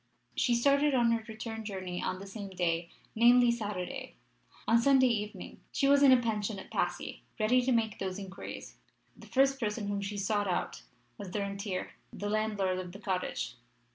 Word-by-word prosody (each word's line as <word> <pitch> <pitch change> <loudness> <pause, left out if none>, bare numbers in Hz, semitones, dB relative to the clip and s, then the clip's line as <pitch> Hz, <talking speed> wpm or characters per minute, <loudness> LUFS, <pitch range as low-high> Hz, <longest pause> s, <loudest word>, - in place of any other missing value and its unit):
She 240 - +2
started 280 +3 +3
on 235 -2 +4
her 230 -1 0
return 225 0 -6
journey 185 -4 -4
on 185 - -2
the 195 - -9
same 200 0 -7
day 170 -2 -1 0.2
namely, 240 +1 +6
Saturday. 220 +3 -4 0.5
On 230 +1 +5
Sunday 265 0 +5
evening 215 -4 -2
she 275 - +1
was 280 0 +5
in 275 -2 +8
a 255 - +8
pension 215 -3 -1
at 190 - -10
Passy, - - -2 0.2
ready 235 +4 +4
to 255 +1 0
make 225 -3 +1
those 190 -1 -3
inquiries. 195 -1 -8 0.4
The - - -14
first 270 +1 +3
person 210 -2 -2
whom 200 0 -1
she 200 +1 -4
sought 205 +1 0
out 180 - -2 0.4
was 200 - -6
the 205 +3 -2
rentier 200 -1 -3 0.2
the 205 - -4
landlord 205 -4 0
of 180 -1 -7
the 200 - -9
cottage. 185 - -2
215 Hz, 180 wpm, -31 LUFS, 195-240 Hz, 0.5 s, in